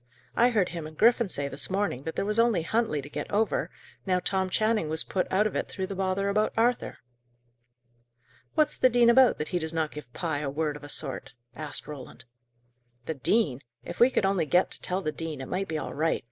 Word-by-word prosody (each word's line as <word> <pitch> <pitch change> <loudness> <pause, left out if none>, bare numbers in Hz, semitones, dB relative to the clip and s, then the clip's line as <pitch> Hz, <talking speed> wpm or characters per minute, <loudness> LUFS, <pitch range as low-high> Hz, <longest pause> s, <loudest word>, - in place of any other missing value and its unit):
I 240 +1 +5
heard 205 -7 +1
him 165 -3 -5
and 155 0 -13
Griffin 235 -1 +4
say 140 -5 0
this 140 +1 -2
morning 190 -9 -1
that 160 - -4
there - - -1
was 210 +2 0
only 230 -8 +3
Huntley 215 - 0
to - - -8
get - - -5
over, 215 +2 0 0.3
now 185 -2 +1
Tom 190 0 0
Channing 215 -4 +1
was 160 +1 0
put 185 - -2
out 200 +3 +3
of 215 - -1
it - - -2
through 190 - -3
the 195 - -5
bother 190 +1 0
about 215 +2 +1
Arthur." 240 +2 +1 1.6
"What's 305 - +2
the 255 - +6
dean 240 -1 +5
about, 260 0 +5
that 150 - -4
he 180 - 0
does 160 0 -4
not 160 -2 -1
give 150 -5 -10
Pye 160 0 -2
a 145 -2 -2
word 150 +1 -1
of 150 - -11
a 145 - -9
sort?" 135 -5 -4 0.2
asked 155 -2 -4
Roland. 140 -4 -10 0.8
"The 160 - -2
dean! 145 - +2 0.2
If - - -8
we 240 - +7
could 230 - +1
only 190 -5 +1
get 180 +4 +3
to - - -7
tell 185 +2 -1
the 155 - -1
dean, 160 -2 -5
it 130 - -6
might 195 +1 -2
be 160 - -2
all - - -5
right. 160 +3 +1
180 Hz, 230 wpm, -28 LUFS, 155-215 Hz, 1.6 s, we